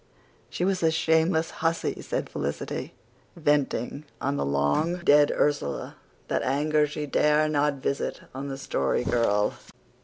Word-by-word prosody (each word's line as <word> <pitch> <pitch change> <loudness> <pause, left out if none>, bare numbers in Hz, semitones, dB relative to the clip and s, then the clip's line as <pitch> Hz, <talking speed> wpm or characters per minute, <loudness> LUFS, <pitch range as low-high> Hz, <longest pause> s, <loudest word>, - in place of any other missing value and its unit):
"She 175 - -2
was 190 -1 0
a 165 - +4
shameless 160 +1 +2
hussy," 165 0 0
said - - -3
Felicity, 70 +1 -4 0.4
venting 145 -3 0 0.2
on 140 +1 -1
the - - -1
long 70 - +1
dead 145 -3 +6
Ursula 70 - -1 0.3
that - - 0
anger 150 +3 +2
she 150 0 -4
dare 150 +2 +3
not 150 -1 +1
visit 140 - -2
on 135 +2 -5
the 135 -1 -5
Story 70 - 0
Girl. 105 -4 +2
150 Hz, 140 wpm, -26 LUFS, 135-160 Hz, 0.4 s, dead